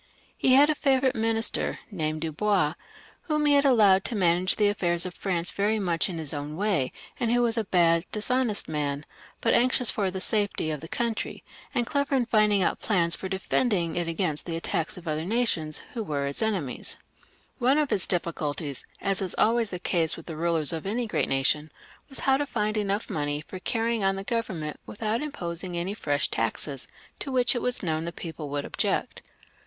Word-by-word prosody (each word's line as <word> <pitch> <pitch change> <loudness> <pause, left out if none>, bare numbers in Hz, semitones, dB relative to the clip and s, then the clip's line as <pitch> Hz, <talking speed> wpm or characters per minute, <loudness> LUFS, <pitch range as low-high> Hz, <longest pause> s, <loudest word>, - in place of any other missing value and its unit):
He 260 - +3
had 285 +2 +7
a 310 - +2
favourite 265 -2 +2
minister, 225 0 +1 0.2
named 155 -4 -2
Dubois, 165 0 +1 0.6
whom 300 -1 +1
he 290 -1 +5
allowed 220 -9 +5
to 240 - -2
manage 180 -1 +3
the 210 - +3
affairs 175 -4 0
of 180 - -5
France 175 -3 -1
very 210 +2 +1
much 175 -2 0
in 175 - -4
his 155 -2 -2
own 145 +1 -4
way, 185 -9 +1 0.3
and 235 -2 +1
who 245 0 +3
was 235 -1 +3
a 225 -2 0
bad 170 -2 +3
dishonest 235 0 +1
man, 145 -1 -2 0.4
but 230 - +2
anxious 250 0 +3
for 200 -3 0
the 190 +1 -4
safety 205 -5 0
of 150 - -3
the 165 - -8
country, 230 +3 -3 0.3
and 240 -2 +1
clever 280 +2 0
in 255 -2 +2
finding 210 -4 +3
out - - 0
plans 170 -6 +2
for 190 - -6
defending 190 -2 0
it 175 -1 -1
against 165 -2 -1
the 165 - -2
attacks 165 0 -2
of 180 - -9
the 160 - -3
other 155 +1 -2
nations 180 -7 -1
who 235 - -3
were 145 -6 -2
its 140 +7 +2
enemies. 195 - -1 0.6
One 260 +3 +4
of 300 -2 +1
his 190 - +1
great 175 -2 +3
difl&culties, 150 -4 -4 0.2
as 195 0 +1
is 185 -2 -2
always 230 0 +3
the 180 - -4
case 170 -2 +1
with 165 - -10
the 165 - -6
rulers 165 -1 +1
of 165 +3 -4
any 235 +4 -1
great 215 - -1
nation, 150 +3 +1 0.4
was 270 - +2
how 270 -1 +4
to 290 +1 -2
find 215 -4 -1
enough 205 0 -1
money 145 -1 -2
for 185 +4 -8
carrying 230 +1 0
on 195 0 +2
the 195 - -5
Govern 215 -5 -2
ment 150 0 -5
without 220 +2 -2
putting 170 - -4
on 175 -1 -3
any 185 +4 -2
fresh 145 -8 0
taxes, 130 +4 -2 0.3
to 275 - -4
which 250 -1 +4
it 245 - -2
was 250 -3 0
known 160 -2 -1
the 170 - -3
people 160 -3 -7
would 145 0 -2
object. - - -1
190 Hz, 205 wpm, -27 LUFS, 160-225 Hz, 0.6 s, had